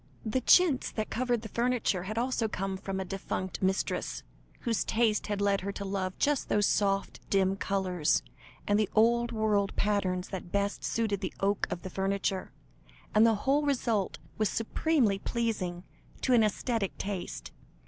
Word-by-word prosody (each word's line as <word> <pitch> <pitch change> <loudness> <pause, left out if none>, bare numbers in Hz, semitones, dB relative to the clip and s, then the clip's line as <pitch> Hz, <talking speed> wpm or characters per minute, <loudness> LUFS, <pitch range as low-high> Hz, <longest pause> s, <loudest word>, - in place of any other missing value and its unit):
The 225 +4 0
chintz 315 0 +5
that 215 -1 -3
covered 245 -2 0
the 220 - -6
furniture, 235 -7 0
had 215 +3 -4
also 245 -1 +1
come 195 -2 -3
from 190 0 -4
a 190 - -3
defunct 190 0 -4
mistress, 190 0 -1 0.4
whose 230 -4 0
taste 220 -2 +1
had 205 -1 -2
led 200 -1 +2
her 200 +2 -3
to 200 - -5
love 190 -1 -2
just 290 -2 +1
those 205 -1 +3
soft, 195 -1 +1
dim 195 -1 +3
colours, 185 -5 0 0.4
and 205 +1 +2
the 215 - +1
old 235 +2 +4
world 210 -3 +1
patterns 195 -3 0
that 180 -2 -6
best 200 0 -1
suited 215 -4 -1
the 185 - -4
oak 200 +1 +1
of 175 - -5
the 185 - -5
furniture 195 0 -1 0.6
and 215 +2 +6
the 225 - +4
whole 280 +2 +4
result 240 -8 0 0.2
was 215 -2 +2
supremely 230 -2 +1
pleasing 200 -8 -2 0.4
to 255 - +2
an 235 - +6
æsthetic 215 -1 0
taste. 180 - -5
205 Hz, 165 wpm, -30 LUFS, 195-230 Hz, 0.6 s, and